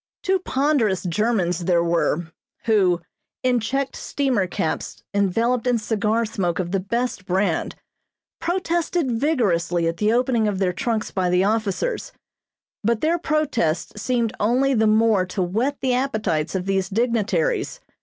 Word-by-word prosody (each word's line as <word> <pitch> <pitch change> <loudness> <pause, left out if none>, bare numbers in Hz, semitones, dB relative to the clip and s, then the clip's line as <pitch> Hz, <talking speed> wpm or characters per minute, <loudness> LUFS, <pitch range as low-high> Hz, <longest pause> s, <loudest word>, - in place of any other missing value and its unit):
] - - -75
Two 380 0 +2
ponderous 270 - +1
Germans 180 -2 0
there 170 -1 +3
were, 170 -1 0 0.3
who, 190 -6 +3 0.4
in 250 -1 +3
checked 270 +4 -2
steamer 255 -9 0
caps 160 -2 -3
enveloped 225 +5 +1
in 245 -1 +3
cigar 220 +1 0
smoke 185 -5 -2
of 175 -2 -2
the 195 - +1
best 200 0 -2
brand, 185 -2 0 0.6
protested 345 -4 0
vigorously 205 - +1
at 165 0 -2
the 210 +1 +2
opening 240 -2 +2
of 205 -2 -1
their 185 -2 +1
trunks 220 +4 -2
by 185 -2 0
the 180 +1 +3
officers, 225 - -1 0.7
but 230 +1 +1
their 335 +2 +2
protests 240 - -1
seemed 235 -2 0
only 255 +6 +2
the 220 -3 +3
more 215 -2 +4
to 185 +1 -2
whet 230 +11 -1
the 260 -1 +1
appetites 215 - -1
of 185 -1 -1
these 195 -1 0
dignitaries. 235 - 0
220 Hz, 145 wpm, -22 LUFS, 185-255 Hz, 0.7 s, more